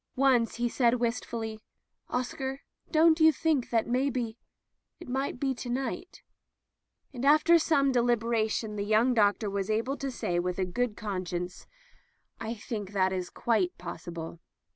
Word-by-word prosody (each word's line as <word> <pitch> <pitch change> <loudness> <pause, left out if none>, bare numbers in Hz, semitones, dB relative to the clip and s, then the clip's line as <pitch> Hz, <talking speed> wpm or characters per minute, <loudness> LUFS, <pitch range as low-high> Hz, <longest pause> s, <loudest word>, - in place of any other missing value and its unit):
Once 255 -3 +3
he 240 +1 0
said 240 0 +2
wistfully: 230 -2 -3 0.5
"Oscar, 265 +2 -3 0.3
don't 320 0 +5
you 320 0 +7
think 305 -3 0
that 225 -2 +2
maybe 250 -2 -1 0.4
— - - -55
^it - - -11
might 265 0 -2
be 270 -1 0
to 245 0 -7
night? 260 +7 -4 0.4
*' - - -49
And 250 -1 -6
after 310 +4 +6
some 280 -4 +3
deliberation 230 -3 +1
the 200 - -1
young 220 +4 +3
doctor 210 -1 +2
was 200 0 -2
able 230 +6 0
to 275 - -3
say 175 -8 -1
with 180 0 -2
a 190 - +1
good 225 +4 -2
con 190 -4 -4
science: 180 +1 -5 0.7
"I 225 +1 -4
think 205 -2 -6
it 190 -1 +2
is 180 -1 -3
quite 210 -7 0
possible." 170 -1 -7
235 Hz, 160 wpm, -29 LUFS, 205-265 Hz, 0.7 s, you